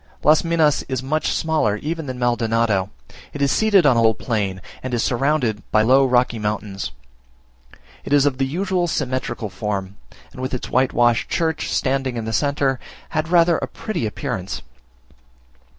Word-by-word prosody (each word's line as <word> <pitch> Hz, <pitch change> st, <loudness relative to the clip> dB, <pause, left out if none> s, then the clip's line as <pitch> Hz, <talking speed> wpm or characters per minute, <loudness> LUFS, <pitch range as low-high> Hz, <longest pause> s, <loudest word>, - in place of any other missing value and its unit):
Las 150 Hz, +1 st, +5 dB
Minas 165 Hz, -3 st, +2 dB
is 130 Hz, -1 st, -2 dB
much 155 Hz, +3 st, 0 dB
smaller 155 Hz, -10 st, +1 dB
even 160 Hz, +4 st, -4 dB
than 130 Hz, -1 st, -5 dB
Maldonado. 115 Hz, -5 st, +1 dB, 0.4 s
It 145 Hz, -, -6 dB
is 140 Hz, -, +2 dB
seated 205 Hz, -6 st, +4 dB
on 135 Hz, -4 st, +5 dB
a -, -, +3 dB
little 110 Hz, -1 st, +4 dB
plain, 100 Hz, -5 st, -2 dB, 0.2 s
and 130 Hz, -1 st, -3 dB
is 115 Hz, -, 0 dB
surrounded 125 Hz, -4 st, 0 dB
by 110 Hz, -, +4 dB
low 135 Hz, +4 st, +5 dB
rocky 125 Hz, -2 st, +2 dB
mountains. 105 Hz, -2 st, -3 dB, 1.1 s
It -, -, -8 dB
is 145 Hz, -1 st, +5 dB
of 135 Hz, -2 st, 0 dB
the 135 Hz, -, +1 dB
usual 180 Hz, +3 st, -1 dB
symmetrical 130 Hz, -, -2 dB
form, 100 Hz, -1 st, -4 dB, 0.3 s
and -, -, -9 dB
with 130 Hz, 0 st, -2 dB
its 125 Hz, -, -6 dB
whitewashed 120 Hz, -2 st, +2 dB
church 160 Hz, -2 st, -1 dB
standing 135 Hz, -2 st, 0 dB
in 115 Hz, -, -3 dB
the 110 Hz, -, -3 dB
centre, 140 Hz, 0 st, +1 dB, 0.3 s
had 155 Hz, +1 st, -2 dB
rather 170 Hz, -1 st, +4 dB
a -, -, -3 dB
pretty 185 Hz, -, -3 dB
appearance. 100 Hz, -3 st, -4 dB
130 Hz, 165 wpm, -21 LUFS, 110-150 Hz, 1.1 s, Las